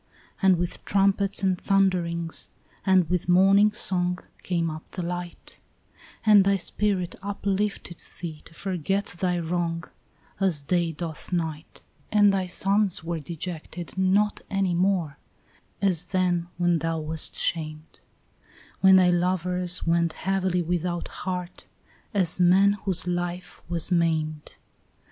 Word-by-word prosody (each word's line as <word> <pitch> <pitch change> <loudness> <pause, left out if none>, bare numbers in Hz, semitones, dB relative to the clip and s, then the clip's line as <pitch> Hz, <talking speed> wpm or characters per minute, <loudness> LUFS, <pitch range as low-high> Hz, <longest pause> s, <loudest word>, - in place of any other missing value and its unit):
And 190 -2 +5
with 175 0 -3
trumpets 195 0 +1
and 185 -2 +1
thunderings 175 -4 0 0.4
and 185 -3 +4
with 180 0 -1
morning 195 +3 +5
song 180 -3 0 0.2
Came 170 -2 -1
up 155 +1 -7
the 180 - -5
light; 175 0 -6 0.7
And 210 -2 +7
thy 200 +1 +3
spirit 190 0 -1
uplifted 200 -2 -3 0.2
thee 160 -3 -6
to 165 - -15
forget 195 +2 -1
thy 180 0 -1
wrong 170 0 -2 0.6
As 180 -7 +1
day 170 +2 +1
doth 160 +2 -7
night. 160 -3 -4 0.3
And 205 -1 +5
thy 190 -2 0
sons 195 0 +1
were 170 0 -3
dejected 170 +2 -7
not 190 +2 +2
any 195 -3 0
more, 175 -4 0 0.6
as 180 -3 +2
then 175 -2 0
When 175 -1 +2
thou 165 +1 -1
wast 155 0 -1
shamed; 155 -1 -3 0.8
When 190 0 +7
thy 180 -1 +5
lovers 180 0 0
went 170 -1 +2
heavily 190 -2 0
without 175 0 -2
heart, 180 -1 -6 0.4
as 185 -6 +2
men 190 +3 +5
Whose 185 -3 0
life 175 0 -4
was 170 0 -2
maimed. 160 -3 0
180 Hz, 125 wpm, -25 LUFS, 170-190 Hz, 0.8 s, And